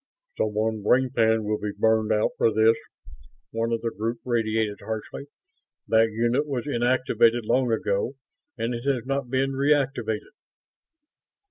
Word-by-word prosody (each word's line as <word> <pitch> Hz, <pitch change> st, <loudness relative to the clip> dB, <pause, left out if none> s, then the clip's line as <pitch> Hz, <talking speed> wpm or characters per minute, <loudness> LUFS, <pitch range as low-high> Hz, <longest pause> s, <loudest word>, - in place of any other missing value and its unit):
"Someone's 110 Hz, 0 st, -1 dB
brain 125 Hz, +4 st, +3 dB
pan 110 Hz, -3 st, +2 dB
will 105 Hz, 0 st, -1 dB
be 105 Hz, -1 st, -4 dB
burned 110 Hz, -1 st, +2 dB
out 105 Hz, 0 st, +2 dB
for 115 Hz, -, +2 dB
this," 110 Hz, +1 st, +4 dB, 0.8 s
one 115 Hz, +1 st, -1 dB
of 115 Hz, -, -1 dB
the 115 Hz, -, -2 dB
group 115 Hz, +2 st, -3 dB
radiated 110 Hz, -3 st, 0 dB
harshly. 110 Hz, +5 st, -6 dB, 0.6 s
"That 115 Hz, 0 st, +4 dB
unit 120 Hz, +6 st, 0 dB
was 130 Hz, -5 st, -3 dB
inactivated 120 Hz, -3 st, +2 dB
long 125 Hz, +1 st, +2 dB
ago 110 Hz, +3 st, -1 dB, 0.4 s
and 115 Hz, +2 st, -2 dB
it 120 Hz, +2 st, -6 dB
has 125 Hz, -3 st, -3 dB
not 135 Hz, -1 st, -2 dB
been 135 Hz, +1 st, 0 dB
reactivated." 135 Hz, -6 st, 0 dB
115 Hz, 140 wpm, -25 LUFS, 110-125 Hz, 0.8 s, this